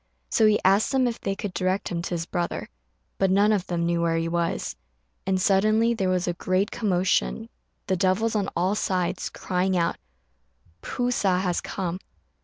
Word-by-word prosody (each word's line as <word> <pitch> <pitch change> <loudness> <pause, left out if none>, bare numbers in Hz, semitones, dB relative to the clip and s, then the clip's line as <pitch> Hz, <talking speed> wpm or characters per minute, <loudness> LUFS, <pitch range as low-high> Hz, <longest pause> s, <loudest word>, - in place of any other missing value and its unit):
So 220 - +4
he 210 -1 +4
asked 195 +6 +4
them 265 -2 +3
if 235 - -4
they 195 - -2
could 195 -1 -5
direct 185 +1 -1
him 170 -1 -2
to 170 - -5
his 165 0 -3
brother 175 -1 -3 0.5
but 195 - +3
none 200 +3 +4
of 200 -4 0
them 170 -1 -1
knew 170 0 +1
where 165 -1 +1
he 165 0 -1
was; 170 0 -1 0.5
and 190 -1 +2
suddenly 215 +4 +3
there 195 -5 0
was 180 -1 0
a 175 - +1
great 185 +3 0
commotion, 200 +2 0 0.4
the 190 - +1
devils 190 +5 +1
on 200 -2 +1
all 180 +3 +1
sides 185 -3 -1
crying 185 0 -1
out, 170 -1 0 0.8
"P'u 245 0 -2
sa 190 -6 +2
has 180 -2 0
come!" 185 -1 -4
185 Hz, 185 wpm, -25 LUFS, 175-205 Hz, 0.8 s, So